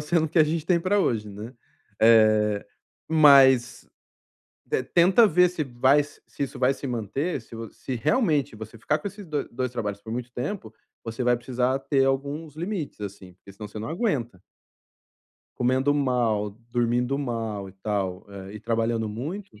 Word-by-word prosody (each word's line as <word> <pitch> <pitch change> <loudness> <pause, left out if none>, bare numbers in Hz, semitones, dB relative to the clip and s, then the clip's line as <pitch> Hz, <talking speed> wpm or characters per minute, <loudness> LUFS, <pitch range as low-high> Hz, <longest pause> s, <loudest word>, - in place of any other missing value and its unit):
sendo 160 +2 +1
o - - -6
que 165 - 0
a 155 - +7
gente 160 +1 -2
tem 175 -2 +3
pra 200 +4 +1
hoje, 110 - 0
né. 105 +5 -8 0.5
Eh, 110 -2 +4 0.4
mas 135 -6 +5 1.1
tenta 185 +6 +6
ver 180 +1 +4
se 170 -4 -3
vai 130 +3 +3
s 145 - -12
se - - -4
isso 135 - -6
vai 130 +1 +3
se 140 - -8
manter, 125 - -2
se 115 - -13
vo 115 -1 -7
se 130 - -6
realmente 150 - +1
você 110 +1 -10
ficar 155 +7 0
com 200 - -5
esses 200 0 -9
do 150 -4 -3
dois 125 +1 -3
trabalhos 105 -4 -4
por 110 - -8
muito 125 0 -5
tempo, 125 - -5 0.3
você 115 +2 -4
vai 120 0 +3
precisar 125 +2 -1
ter 135 -1 +1
alguns 145 +3 -2
limites 170 - -4
assim, 95 -2 -8
porque 100 +2 -16
senão 105 +1 -8
você 105 +1 -8
não 110 - -5
aguenta. 130 - -2 1.2
Comendo 130 +3 +2
mal, 120 -7 +1 0.2
dormindo 120 +3 0
mal 115 -7 -3
e - - -13
tal, 95 -4 -2 0.3
e 105 - -8
e - - -10
trabalhando 115 -1 -1
muito. 140 - -7
125 Hz, 175 wpm, -25 LUFS, 110-150 Hz, 1.2 s, a